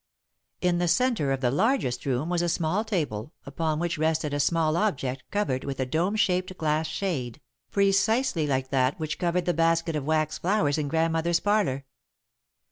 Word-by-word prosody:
In 180 -1 +2
the 175 - +1
centre 230 - +2
of 135 -1 -1
the 125 -2 +2
largest 185 - 0
room 135 +3 0
was 175 0 0
a 175 - 0
small 175 +5 0
table, 155 - -3
upon 160 -2 -2
which 170 -1 -2
rested 155 -1 0
a 145 - -1
small 155 +1 +2
object 135 -10 -1
covered 205 -11 -1
with 135 -1 -5
a 130 - +1
dome 170 +10 0
shaped 185 -2 0
glass 155 0 0
shade, 155 - -3 0.3
precisely 200 - +2
like 130 -2 -1
that 135 +4 +1
which 155 -1 -3
covered 175 0 0
the 175 - +1
basket 165 0 +1
of 150 - -2
wax 155 -1 0
flowers 165 -6 +1
in 150 - -1
Grandmother's 165 +2 +1
parlour. 200 -11 0
160 Hz, 175 wpm, -26 LUFS, 145-180 Hz, 0.3 s, In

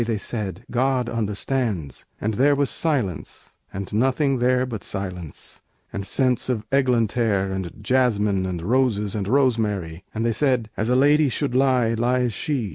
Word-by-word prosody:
they 115 -1 -1
said, 105 -1 -4
"God 130 0 +1
understands." 105 - -2
And 110 +1 -1
there 140 +6 +4
was 140 -2 0
silence, 125 - -2 0.2
and 95 +1 -6
nothing 135 +4 +2
there 125 +1 +2
But 115 -5 -6
silence, 90 -5 -6 0.3
and 100 -1 -4
scents 130 -2 +1
of 110 -4 -1
eglantere, 115 -6 +2
And 95 -2 -3
jasmine, 105 -6 +2
and 90 -2 -4
roses 105 -2 +1
and 100 -3 -2
rosemary; 105 -9 +1
And 115 +1 -2
they 115 - +2
said, 125 -3 0
"As 110 +3 -1
a 125 - +3
lady 145 +2 +4
should 135 +1 -2
lie, 130 -3 +3
lies 120 +1 +1
she." 130 -3 -2
115 Hz, 155 wpm, -23 LUFS, 100-130 Hz, 0.3 s, there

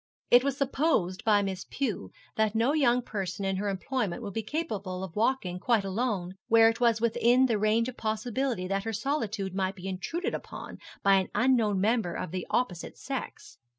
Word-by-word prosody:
It 245 +1 +7
was 275 -1 -1
supposed 270 - 0
by 205 -2 +4
Miss 190 -1 -4
Pew 215 - -2 0.3
that 220 0 +1
no 235 +6 +3
young 250 -5 +3
person 195 -2 -4
in 195 -1 0
her 205 +1 -1
employment 210 +1 -2
would 200 -3 -5
be 225 - -1
capable 210 - -3
of 185 -3 -7
walking 210 -5 0
quite 225 +1 +2
alone, 195 -3 -2
where 225 0 +6
it 225 - -3
was 235 -2 +3
within 240 +3 +3
the 225 -5 +1
range 215 +3 +2
of 255 - -7
possibility 220 -1 -2
that 195 +1 -1
her 225 +1 -3
solitude 215 -7 -2
might 190 0 -1
be 190 -1 -8
intruded 195 - -3
upon - - -7 0.2
by 195 0 +6
an 190 - 0
unknown 230 -6 +3
member 215 -3 +1
of 170 - -4
the 185 -1 -4
opposite 180 -9 -1
sex. - - -6
215 Hz, 185 wpm, -28 LUFS, 190-245 Hz, 0.3 s, It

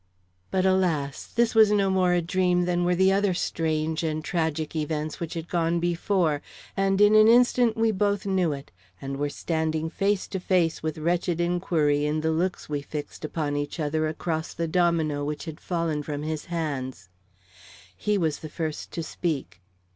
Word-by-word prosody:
But 190 0 +1
alas! 170 -7 +1
this 235 -1 +1
was 220 -2 +7
no 200 -2 +3
more 185 -1 +3
a 175 -1 +2
dream 180 0 +2
than 175 0 +1
were 175 0 +2
the 190 +2 +4
other 200 -2 +2
strange 160 -1 -1
and 155 -1 -2
tragic 160 -2 -1
events 155 0 -2
which 170 -1 -5
had 165 0 -5
gone 170 -1 +1
before; 170 -3 +1 0.3
and 195 0 +1
in 205 +1 +6
an 215 0 +7
instant 240 -1 +4
we 225 0 +3
both 205 0 0
knew 185 -4 +1
it, 140 -1 -7 0.3
and 135 0 -5
were 145 +1 -1
standing 160 +1 -2
face 200 0 0
to 190 - -3
face 175 -3 +1
with 155 0 -3
wretched 170 +1 0
inquiry 170 -4 +1
in 155 +1 0
the 160 0 +1
looks 175 +3 -1
we 145 -1 -2
fixed 145 +1 -7
upon 150 -1 -2
each 145 +3 -3
other 155 +1 0
across 160 0 -3
the 165 0 -1
domino 160 -4 +1
which 150 +2 -4
had 160 -1 -7
fallen 165 -4 -1
from 145 0 -4
his 155 -1 -3
hands. 135 - -4 0.9
He 210 - 0
was 160 -5 0
the 155 - -8
first 155 -1 -4
to 165 - -3
speak. 155 - -3
165 Hz, 180 wpm, -26 LUFS, 155-185 Hz, 0.9 s, was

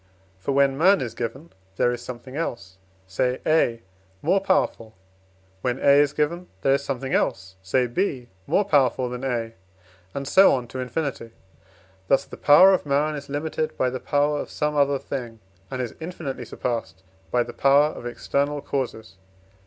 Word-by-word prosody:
For, 115 - -2
when 140 0 +2
man 190 +4 +5
is 120 -4 -4
given, 125 +8 -6 0.2
there 120 - +2
is 120 -1 -4
something 125 +2 -9
else 115 - -5 0.3
say 125 +7 -1
A 120 -7 +2 0.4
more 185 +5 +3
powerful; 190 - 0 0.7
when 125 0 -1
A 140 +1 +5
is 145 -1 +2
given, 170 +4 -1 0.2
there 135 - +4
is 140 0 0
something 135 -1 -3
else 95 0 -1
say 125 +7 +1
B 125 -1 -2 0.2
more 205 - +2
powerful 130 -7 +2
than 125 +1 -6
A, 115 -3 -2 0.6
and 140 0 -4
so 190 +4 +6
on 125 -2 -4
to 130 - -6
infinity; 130 -3 -4 0.7
thus 135 - +3
the - - -10
power 185 +7 +7
of 185 - +1
man 145 +2 +1
is 145 -1 -7
limited 155 +2 -3
by 130 -1 +1
the 130 - -4
power 145 +1 +1
of - - -5
some 150 0 -2
other 140 -1 +3
thing, 120 -4 -6 0.3
and 130 0 -3
is 120 - -6
infinitely 160 -5 -6
surpassed 95 -8 -4 0.3
by 120 -1 +2
the - - -9
power 140 +2 +4
of 120 - -8
external 140 +4 -1
causes. 115 -8 -4
135 Hz, 170 wpm, -24 LUFS, 120-150 Hz, 0.7 s, power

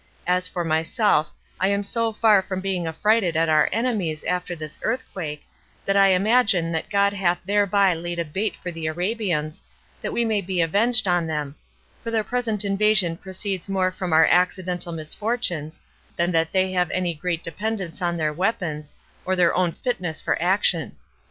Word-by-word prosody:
As 180 +1 +2
for 175 - -3
myself, 160 +2 +1 0.3
I 190 - +2
am 200 +1 +1
so 230 +3 0
far 215 -2 +4
from 185 0 -4
being 185 -3 -2
affrighted 185 +1 +1
at 165 0 +2
our 155 -1 +4
enemies 205 -9 -1
after 180 -1 -2
this 155 -2 -8
earthquake, 185 -11 -4 0.4
that 195 - +1
I 195 0 +6
imagine 195 -3 +3
that 165 +5 -3
God 200 -1 +2
hath 180 -3 +1
thereby 200 -1 +3
laid 175 +1 -5
a 170 - -1
bait 195 +8 -2
for 180 - -6
the 165 -1 -5
Arabians, 175 -3 -2 0.4
that - - -3
we 235 - 0
may 215 -2 +1
be 185 -1 -3
avenged 205 +7 +3
on 175 -2 +1
them; 150 -3 -3 0.5
for 230 - -4
their 225 -1 +1
present 225 -2 -1
invasion 195 -3 +3
proceeds 190 +1 -4
more 185 -1 +1
from 185 -1 -5
our 160 0 +6
accidental 180 0 +1
misfortunes, 165 -1 -2 0.4
than 170 +1 +1
that 165 -1 +1
they 190 -1 +2
have 180 -2 +1
any 180 -2 -1
great 170 +1 -3
dependence 185 -1 -4
on 175 -1 0
their 155 -2 0
weapons, 160 -5 -2 0.3
or 190 - 0
their 175 -2 +3
own 180 -2 +1
fitness 180 -8 -3
for - - 0
action. 175 - +1
180 Hz, 175 wpm, -23 LUFS, 165-205 Hz, 0.5 s, I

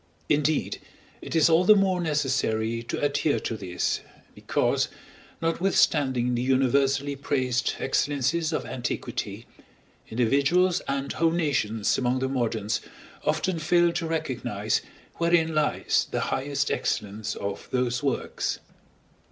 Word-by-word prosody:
Indeed, 150 +1 +1 0.4
it - - -6
is 160 -1 +5
all 165 +1 +4
the 215 +3 +7
more 190 -2 +2
necessary 130 -7 0
to 115 - -4
adhere 145 +1 +1
to 115 - -3
this, 90 -4 -2 0.3
because, - - 0 0.6
notwithstanding 145 -8 +2
the 120 - 0
universally 135 +2 +2
praised 130 -3 0
excellences 150 +3 0
of - - -2
antiquity, 120 -2 -4 0.6
individuals 140 +10 +2
and 140 0 -2
whole 165 0 +2
nations 135 -10 0
among 125 0 +1
the 130 +1 0
moderns 115 -5 -1 0.4
often 185 -3 0
fail 175 +2 +3
to 170 -1 -2
recognize 155 -6 -1 0.4
wherein 170 -1 +2
lies 155 -1 +1
the - - -1
highest 140 +1 -1
excellence 105 +1 -2
of 100 0 -5
those 125 -1 0
works. 140 -3 -1
140 Hz, 120 wpm, -26 LUFS, 125-160 Hz, 0.6 s, the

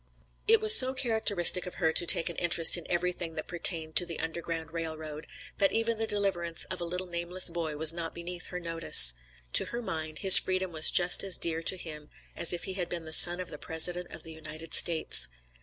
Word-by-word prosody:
It 450 +1 +3
was 435 0 +8
so 260 0 +6
characteristic 210 -8 +1
of 180 - -11
her 160 -3 -3
to 175 - 0
take 165 - +4
an 170 - -6
interest 170 -1 +4
in 175 - -8
everything 175 -1 -5
that - - -8
pertained 165 -2 -1
to 175 - -1
the 165 - -8
Underground 165 0 -8
Rail 165 -1 -7
Road, 155 -1 -11 0.3
that 195 - 0
even 225 0 -3
the 225 - -3
deliverance 185 -5 -3
of 185 -1 -7
a - - -5
little 180 +2 -5
nameless 175 +1 0
boy 165 -3 -7
was 160 +1 +2
not 165 -1 -8
beneath 175 +1 -9
her 180 - -9
notice. 165 - +3 0.4
To - - +2
her 235 - -6
mind, 155 -5 -8
his 190 -2 +8
freedom 185 -1 -5
was 155 -1 +3
just 175 0 +2
as 195 -3 +3
dear 165 -1 -3
to 185 - -2
him 150 -3 -12 0.3
as 170 - -1
if 175 - -5
he 190 - -7
had 180 -2 -6
been 170 -2 -8
the 160 - -6
son 175 +2 +5
of 180 - -8
the 150 - -11
President 175 +2 -4
of 165 - -13
the 160 - -13
United 160 +1 -11
States. 160 - +3
170 Hz, 225 wpm, -26 LUFS, 160-180 Hz, 0.4 s, was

